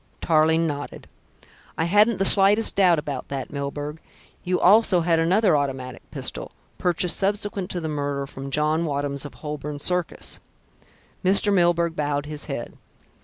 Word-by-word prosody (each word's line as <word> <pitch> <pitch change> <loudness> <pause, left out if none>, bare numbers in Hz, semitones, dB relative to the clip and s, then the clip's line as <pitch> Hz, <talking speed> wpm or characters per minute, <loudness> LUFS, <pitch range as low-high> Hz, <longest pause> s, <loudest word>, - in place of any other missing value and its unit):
Tarling 160 +1 +2
nodded. 145 -2 -6 0.7
"I - - 0
hadn't 210 +5 +3
the 195 - 0
slightest 205 +3 +7
doubt 185 -4 +4
about 145 -3 -5
that, 135 -2 -6
Milburgh. 145 +2 -5 0.4
You 180 0 -1
also 195 -2 +4
had 165 -1 +1
another 185 +3 +2
automatic 130 -3 -3
pistol, - - -5 0.3
purchased 175 0 0
subsequent 200 -1 -2
to 180 - -4
the 160 - -5
murder 145 -2 -3
from 135 0 -9
John 150 +3 0
Wadham's 140 -2 -3
of 145 - -10
Holborn 150 -1 -6
Circus." 180 +3 -2 0.8
Mr. 200 +2 +2
Milburgh 170 -2 +1
bowed 145 -1 -2
his 150 0 -5
head. 140 -5 -7
160 Hz, 145 wpm, -23 LUFS, 145-180 Hz, 0.8 s, slightest